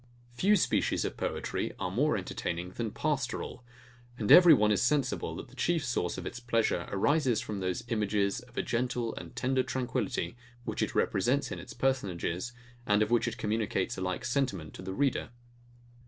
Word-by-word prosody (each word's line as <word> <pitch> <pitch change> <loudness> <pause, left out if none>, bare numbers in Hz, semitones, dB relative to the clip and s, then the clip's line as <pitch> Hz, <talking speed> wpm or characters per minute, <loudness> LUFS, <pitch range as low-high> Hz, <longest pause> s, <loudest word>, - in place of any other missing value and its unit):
Few 195 +12 +4
species 185 - +1
of - - -3
poetry - - -2
are 90 - -2
more 140 +6 +2
entertaining 90 -1 -4
than 115 +3 -3
PASTORAL; 135 -1 -2 0.5
and 105 -4 0
every 175 -2 +10
one 105 -8 +6
is 105 - +2
sensible, 135 0 +1
that - - -8
the 130 - -16
chief 165 +2 +1
source 120 -8 -1
of - - -6
its 120 - -5
pleasure 115 -7 0
arises 130 +2 +2
from 105 -3 -4
those 90 +3 -2
images 105 -3 0
of 120 0 -17
a - - +1
gentle 120 -1 -1
and - - -9
tender 130 0 +1
tranquillity, 120 -8 -2 0.3
which - - -3
it - - -1
represents 125 +9 +1
in - - -4
its - - -10
personages, 100 -6 -1 0.4
and 105 +1 +4
of 105 - -3
which 120 0 +3
it 115 - -3
communicates 105 -3 -1
a 95 - -6
like 95 +6 -2
sentiment 125 - -1
to - - -9
the 95 0 -5
reader. 135 -1 +1
120 Hz, 180 wpm, -30 LUFS, 100-130 Hz, 0.5 s, every